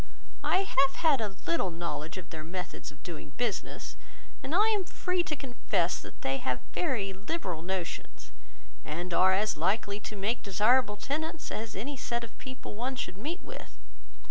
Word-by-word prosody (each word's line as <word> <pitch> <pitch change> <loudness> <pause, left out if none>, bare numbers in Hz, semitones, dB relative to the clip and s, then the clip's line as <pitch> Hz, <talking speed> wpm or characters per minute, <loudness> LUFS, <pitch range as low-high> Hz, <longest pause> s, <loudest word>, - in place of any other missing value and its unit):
I 375 - +4
have 275 -7 +4
had 300 -7 +4
a 205 -3 -1
little 335 - +2
knowledge 170 -1 -3
of 180 -2 -7
their 155 -2 -4
methods 180 -1 -4
of 150 - -18
doing 160 -5 -6
business; 235 -4 -1 0.5
and 300 - -1
I 425 +4 +7
am 420 -3 +3
free 360 0 +1
to 315 -3 -1
confess 240 -10 +1
that - - -11
they 135 0 +2
have 125 -2 0
very 230 - +1
liberal 190 - -2
notions, 180 -1 -3 0.5
and 175 +4 -3
are 185 +2 +7
as 210 0 +2
likely 200 +4 +2
to 210 - -6
make 210 +4 +1
desirable 210 +2 +4
tenants 310 +7 -2
as 220 0 -3
any 265 +8 -3
set 235 -1 -1
of 230 - -8
people 260 -4 -6
one 250 +5 -1
should 245 - -3
meet 305 - -3
with. - - -8
210 Hz, 170 wpm, -31 LUFS, 180-270 Hz, 0.5 s, I